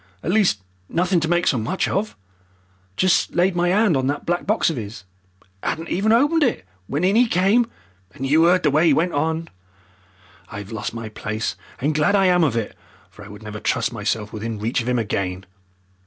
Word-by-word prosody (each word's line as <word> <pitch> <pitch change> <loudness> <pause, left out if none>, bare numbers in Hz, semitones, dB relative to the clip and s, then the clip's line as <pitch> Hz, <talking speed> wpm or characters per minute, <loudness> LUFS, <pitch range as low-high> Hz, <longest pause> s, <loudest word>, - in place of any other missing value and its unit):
At 170 - -1
least 190 - +2 0.3
nothing 180 +1 +1
to 160 - -1
make 175 +1 +1
so 125 - +2
much 180 +13 -1
of. 210 - -2 0.8
Just 185 -1 +2
laid 180 +2 +2
my 175 0 +2
'and 200 -2 +3
on 130 -1 0
that 145 +1 -2
black 175 +2 -1
box 215 -4 +2
of 160 - -5
'is 105 -3 -8 0.6
'adn't 165 +1 -3
even 205 +5 +1
opened 290 +8 +3
it, 245 - +1 0.2
when 145 +5 -2
in 190 +3 +3
'e 240 +1 +5
came 220 +5 +2 0.5
and 135 - -4
you 160 +5 +4
'eard 180 +1 +3
the 150 - +3
way 155 +4 +3
'e - - +5
went 170 +2 +1
on. 160 +3 -1 1.0
I've 105 -1 -8
lost 110 +1 -4
my 115 -1 -5
place, 110 +1 -4 0.2
and 150 +4 0
glad 155 +7 +2
I 195 -1 +4
am 180 -2 +4
of 130 -7 +1
it, 110 -3 -3 0.4
for 105 - -13
I - - -11
would 105 +1 -12
never 105 0 -7
trust 115 +1 0
myself 105 -1 -2
within 110 +1 -4
reach 115 +4 -1
of 120 - -3
'im 125 - +1
again." 95 -4 -2
155 Hz, 205 wpm, -22 LUFS, 115-185 Hz, 1.0 s, e